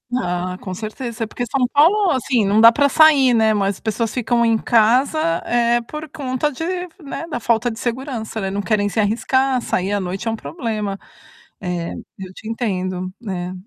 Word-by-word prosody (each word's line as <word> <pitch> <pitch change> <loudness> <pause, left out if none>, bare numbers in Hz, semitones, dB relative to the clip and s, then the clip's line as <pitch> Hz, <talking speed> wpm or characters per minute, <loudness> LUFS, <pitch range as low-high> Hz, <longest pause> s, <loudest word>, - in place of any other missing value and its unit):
Ah, 180 -5 -2
com 185 - -5
certeza 225 +3 -5
é - - -10
porque 245 +3 -4
São 250 +1 0
Paulo, 355 +8 +4
assim, 250 -5 +1
não 205 +2 +3
dá 230 +1 +10
para 285 +4 +3
sair, 285 -4 +5
né, 220 -1 +3
mas 200 -1 0
as - - -15
pessoas 220 0 -2
ficam 240 -1 +1
em 225 -1 +3
casa 245 +7 +3 0.3
é 240 0 +2
por 305 +6 -8
conta 275 -1 -2
de, 295 +3 -6 0.4
né, 305 +4 -6
da 240 - -4
falta 235 +1 +1
de 225 - -7
segurança 240 -2 -4
não 195 - -2
não 200 - -2
querem 205 -1 +1
se 215 +2 0
arriscar, 255 +5 +1
sair 190 -3 -1
à 205 - +1
noite 190 +4 -4
é 225 - +1
um - - -2
problema. 215 - -4 1.2
Eu 190 -1 -8
te 215 - -10
entendo, 185 -5 -3
né. 185 -5 -4
230 Hz, 190 wpm, -20 LUFS, 205-260 Hz, 1.2 s, dá